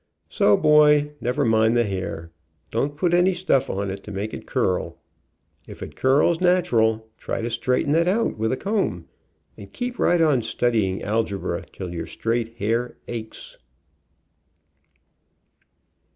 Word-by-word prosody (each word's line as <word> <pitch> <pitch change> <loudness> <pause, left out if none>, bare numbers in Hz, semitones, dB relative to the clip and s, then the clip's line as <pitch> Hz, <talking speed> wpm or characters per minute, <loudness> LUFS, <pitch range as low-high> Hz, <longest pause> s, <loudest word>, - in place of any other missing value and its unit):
So, 105 - +3
boy, 150 -1 +5
never 125 +1 0
mind 110 +1 +3
the 120 - +4
hair. 95 -5 -5 0.4
Don't 145 +6 -1
put 175 +2 +1
any 180 +1 +3
stuff 175 -7 +1
on 100 0 -2
it 95 0 -7
to 105 - -8
make 100 +2 -4
it - - -8
curl. - - -1 0.7
If - - -9
it - - -9
curls 150 +6 +2
natural, 115 -12 +2
try - - -4
to 115 +1 -3
straighten 125 +4 0
it 170 +2 +3
out 215 +5 +1
with 110 +1 -1
a 130 - -1
comb, 205 0 -2 0.5
and - - -11
keep 245 -1 -5
right 175 - +3
on 150 -6 +3
studying 110 -4 0
algebra, 105 -2 -2
till 90 -2 -7
your 85 - -5
straight 115 0 -3
hair 115 +3 -1
aches. 110 -2 -8
120 Hz, 145 wpm, -23 LUFS, 110-155 Hz, 0.7 s, boy